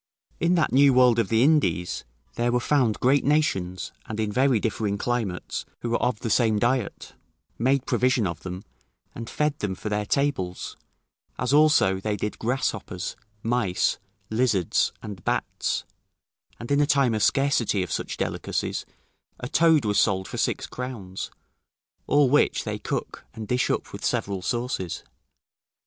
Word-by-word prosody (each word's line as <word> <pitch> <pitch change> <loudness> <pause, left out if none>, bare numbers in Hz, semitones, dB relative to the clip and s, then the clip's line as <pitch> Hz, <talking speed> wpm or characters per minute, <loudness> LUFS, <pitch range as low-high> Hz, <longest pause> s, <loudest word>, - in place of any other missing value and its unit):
In 170 +2 +3
that 165 - +2
new 135 0 +5
world 125 -2 +5
of 110 - +1
the 115 +1 +4
Indies, 140 - +1 0.3
there 120 0 0
were 125 - +2
found 125 -4 +1
great 135 +2 +3
nations, 95 -12 0 0.2
and 110 0 -5
in 110 -1 0
very 130 +1 +3
differing 105 -2 -1
climates, 110 -5 -2 0.2
who 120 - -3
were 115 - +1
of 125 -3 0
the 115 - -2
same 110 -3 +3
diet, 120 +1 -1 0.5
made 135 +2 +2
provision 125 -2 +2
of 85 -3 -3
them, 90 +1 -7 0.5
and 115 0 -7
fed 150 -1 -1
them 95 -2 -2
for 105 - -5
their 105 0 -1
tables; 120 -12 -1 0.6
as 125 +2 0
also, 150 -11 +5
they 105 +1 -2
did 105 +2 -4
grasshoppers, 110 -6 -2 0.3
mice, 115 -6 +1 0.3
lizards, 110 -6 +2
and 100 -5 -8
bats; - - -1 0.7
and 120 - -6
in 140 - +4
a 145 - +3
time 140 -5 +3
of 110 - -1
scarcity 125 -7 +2
of 90 - -7
such - - -3
delicacies, - - -2 0.5
a 125 - -4
toad 160 -2 +4
was 105 -1 +2
sold 95 -3 +2
for - - -6
six - - 0
crowns, 115 -8 -6 0.8
all 145 -1 +4
which 145 +4 +3
they - - -4
cook, - - -4
and 110 -1 -6
dish 125 +2 +1
up - - -2
with - - -7
several 100 -2 -1
sauces. 120 -5 -2
120 Hz, 160 wpm, -25 LUFS, 100-135 Hz, 0.8 s, new